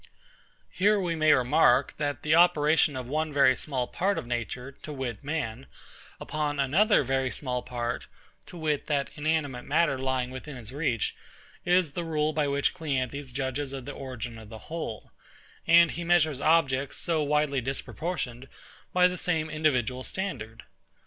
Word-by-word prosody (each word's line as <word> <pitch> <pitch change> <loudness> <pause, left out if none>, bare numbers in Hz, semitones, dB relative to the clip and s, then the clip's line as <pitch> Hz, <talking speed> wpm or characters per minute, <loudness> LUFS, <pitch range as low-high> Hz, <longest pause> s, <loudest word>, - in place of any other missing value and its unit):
Here 205 +2 +3
we 175 -3 -1
may 155 -1 +4
remark, 130 0 +4
that 145 -1 -2
the 155 - +2
operation 160 -3 +4
of 130 -1 -4
one 155 +4 -1
very 135 -2 +5
small 130 -4 -2
part 195 +9 -1
of - - -3
nature, 120 +2 -4
to 155 - -7
wit 130 -5 -5
man, 135 -5 -3 0.5
upon 150 -1 -2
another 165 - +4
very 135 0 0
small 125 -2 -3
part, 120 -1 -4 0.4
to 175 - -10
wit 155 -3 -1
that 140 -2 0
inanimate 150 -5 -1
matter 145 -2 +2
lying 130 -1 -1
within 130 +3 -8
his 120 0 -8
reach, 135 -7 -1 0.5
is 180 -3 +3
the 175 +4 -3
rule 155 -1 0
by 150 -2 +1
which 140 0 +1
CLEANTHES 140 -4 -3
judges 135 +1 -3
of 135 -2 -6
the 145 - -5
origin 125 -4 -7
of 110 -1 -12
the 110 +8 -11
whole; 115 - -5 0.6
and 170 0 +7
he 170 - -5
measures 160 -5 +2
objects, 140 -4 +2
so 165 -2 0
widely 150 -2 +1
disproportioned, 135 0 -4 0.5
by 180 0 +6
the 180 -1 -4
same 160 -3 -1
individual 130 -5 +1
standard. 120 - -4
145 Hz, 160 wpm, -28 LUFS, 130-160 Hz, 0.6 s, and